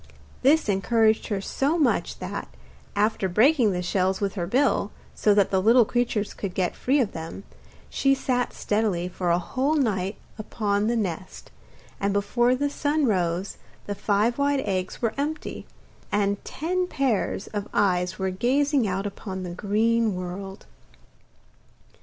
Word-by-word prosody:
This 300 Hz, +3 st, +4 dB
encouraged 220 Hz, +2 st, +2 dB
her 200 Hz, -3 st, -2 dB
so 280 Hz, -, 0 dB
much 295 Hz, -6 st, +1 dB
that, -, -, -5 dB, 0.5 s
after 205 Hz, -2 st, +1 dB
breaking 235 Hz, -, +4 dB
the 180 Hz, -1 st, -2 dB
shells 190 Hz, +1 st, 0 dB
with 200 Hz, -2 st, -1 dB
her 175 Hz, -4 st, -3 dB
bill, 255 Hz, -1 st, +2 dB, 0.2 s
so 210 Hz, -1 st, +3 dB
that 200 Hz, -2 st, +3 dB
the 190 Hz, -1 st, +2 dB
little 230 Hz, +3 st, +6 dB
creatures 230 Hz, -3 st, -1 dB
could 195 Hz, -3 st, -5 dB
get 180 Hz, -2 st, 0 dB
free 275 Hz, +3 st, +1 dB
of 230 Hz, -6 st, +1 dB
them, 165 Hz, +4 st, -7 dB, 0.4 s
she 275 Hz, 0 st, +2 dB
sat 250 Hz, -2 st, -1 dB
steadily 205 Hz, -5 st, -1 dB
for 180 Hz, 0 st, -3 dB
a 170 Hz, -, +4 dB
whole 260 Hz, -, 0 dB
night 200 Hz, -8 st, 0 dB, 0.2 s
upon 210 Hz, -1 st, -1 dB
the 235 Hz, -, +1 dB
nest, 185 Hz, -5 st, -4 dB, 0.5 s
and 200 Hz, 0 st, 0 dB
before 240 Hz, +5 st, +2 dB
the 285 Hz, +3 st, 0 dB
sun 290 Hz, +1 st, 0 dB
arose 180 Hz, -3 st, 0 dB, 0.3 s
the 205 Hz, -, -3 dB
five 210 Hz, +5 st, +1 dB
white 280 Hz, -1 st, +2 dB
eggs 185 Hz, +2 st, -3 dB
were 230 Hz, -, +1 dB
empty, 305 Hz, +2 st, -4 dB, 0.4 s
and 200 Hz, -1 st, 0 dB
ten 360 Hz, +4 st, -2 dB
pairs 255 Hz, -, -1 dB
of 205 Hz, 0 st, -3 dB
eyes 180 Hz, -3 st, +1 dB
were 190 Hz, 0 st, -1 dB
gazing 265 Hz, +5 st, +1 dB
out 190 Hz, +1 st, -2 dB
upon 190 Hz, -1 st, -5 dB
the 180 Hz, -, -5 dB
green 215 Hz, +3 st, +1 dB
world. 190 Hz, +2 st, -6 dB
210 Hz, 155 wpm, -25 LUFS, 190-250 Hz, 0.5 s, little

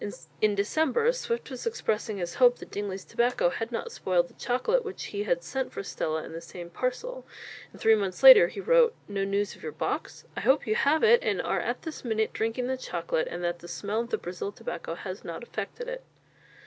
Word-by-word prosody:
In 215 Hz, -1 st, +3 dB
December, 315 Hz, -, +2 dB
Swift 470 Hz, -, -3 dB
was 255 Hz, -, -5 dB
expressing 220 Hz, -, -1 dB
his 175 Hz, -2 st, -3 dB
hope 245 Hz, -1 st, +7 dB
that -, -, -11 dB
Dingley's 195 Hz, -2 st, -4 dB
tobacco 240 Hz, -7 st, +1 dB
had 225 Hz, +5 st, -4 dB
not 230 Hz, -, -3 dB
spoiled 175 Hz, -2 st, +1 dB
the -, -, -20 dB
chocolate 350 Hz, -, 0 dB
which 415 Hz, -4 st, -6 dB
he 205 Hz, 0 st, -2 dB
had 170 Hz, -4 st, 0 dB
sent 265 Hz, +7 st, -3 dB
for -, -, -5 dB
Stella 160 Hz, -4 st, -2 dB
in -, -, -9 dB
the 165 Hz, -, -6 dB
same 175 Hz, 0 st, -9 dB
parcel; -, -, -3 dB, 0.5 s
and -, -, -15 dB
three 225 Hz, -, +5 dB
months 200 Hz, 0 st, -1 dB
later 260 Hz, -10 st, +11 dB
he 185 Hz, -, -8 dB
wrote: 475 Hz, +2 st, +4 dB
"No 200 Hz, -1 st, -2 dB
news 200 Hz, +1 st, -1 dB
of -, -, -18 dB
your 460 Hz, -, -5 dB
box? -, -, -4 dB
I -, -, -3 dB
hope 270 Hz, +2 st, +3 dB
you 215 Hz, -, +1 dB
have 285 Hz, +7 st, +2 dB
it, 475 Hz, +2 st, +6 dB
and -, -, 0 dB
are -, -, 0 dB
this 320 Hz, -2 st, -7 dB
minute 220 Hz, -3 st, 0 dB
drinking 225 Hz, +3 st, -1 dB
the 260 Hz, +1 st, -1 dB
chocolate, 170 Hz, -8 st, -2 dB
and 175 Hz, +1 st, -5 dB
that 175 Hz, 0 st, -1 dB
the 175 Hz, -, -11 dB
smell 205 Hz, +5 st, -2 dB
of 235 Hz, 0 st, -3 dB
the -, -, 0 dB
Brazil 180 Hz, +3 st, -5 dB
tobacco 165 Hz, -4 st, -6 dB
has 185 Hz, +2 st, -7 dB
not 170 Hz, +7 st, -6 dB
affected 235 Hz, -, -6 dB
it." -, -, -5 dB
220 Hz, 215 wpm, -28 LUFS, 190-280 Hz, 0.5 s, later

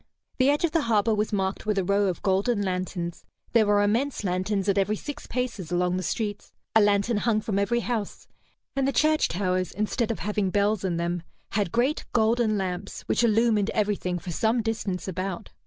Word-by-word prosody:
The 260 Hz, +2 st, +5 dB
edge 295 Hz, +4 st, +3 dB
of 330 Hz, -, -1 dB
the 330 Hz, -, +2 dB
harbor 225 Hz, -3 st, +2 dB
was 210 Hz, 0 st, 0 dB
marked 195 Hz, 0 st, -2 dB
with 210 Hz, -1 st, +1 dB
a 195 Hz, -, +2 dB
row 200 Hz, +2 st, +2 dB
of 180 Hz, -, -3 dB
golden 200 Hz, +3 st, +1 dB
lanterns; 180 Hz, -2 st, -3 dB, 0.3 s
there 225 Hz, -3 st, +4 dB
were 205 Hz, 0 st, +4 dB
immense 235 Hz, +6 st, 0 dB
lanterns 190 Hz, +2 st, -1 dB
at 200 Hz, 0 st, +3 dB
every 205 Hz, +2 st, +1 dB
six 290 Hz, +7 st, -7 dB
paces 240 Hz, -9 st, -3 dB
along 180 Hz, +1 st, +1 dB
the -, -, -2 dB
streets; 205 Hz, +2 st, -3 dB, 0.2 s
a 220 Hz, -, +7 dB
lantern 205 Hz, +2 st, +2 dB
hung 215 Hz, 0 st, +2 dB
from 215 Hz, -2 st, -1 dB
every 235 Hz, +4 st, +1 dB
house; 230 Hz, -4 st, -3 dB, 0.5 s
and 275 Hz, -1 st, +1 dB
the 275 Hz, -, 0 dB
church 310 Hz, 0 st, +3 dB
towers, 185 Hz, 0 st, -1 dB
instead 215 Hz, +3 st, -1 dB
of 230 Hz, -, -1 dB
having 210 Hz, -2 st, -1 dB
bells 205 Hz, +1 st, +1 dB
in 180 Hz, -3 st, -1 dB
them, 170 Hz, +1 st, -1 dB, 0.3 s
had 200 Hz, -4 st, 0 dB
great 255 Hz, +6 st, +1 dB
golden 225 Hz, -1 st, +2 dB
lamps 185 Hz, 0 st, -4 dB
which -, -, 0 dB
illumined 220 Hz, -2 st, +3 dB
everything 200 Hz, -4 st, 0 dB
for 175 Hz, +1 st, -6 dB
some 225 Hz, +6 st, +1 dB
distance 210 Hz, -5 st, -2 dB
about. 185 Hz, 0 st, -4 dB
205 Hz, 195 wpm, -26 LUFS, 190-230 Hz, 0.5 s, a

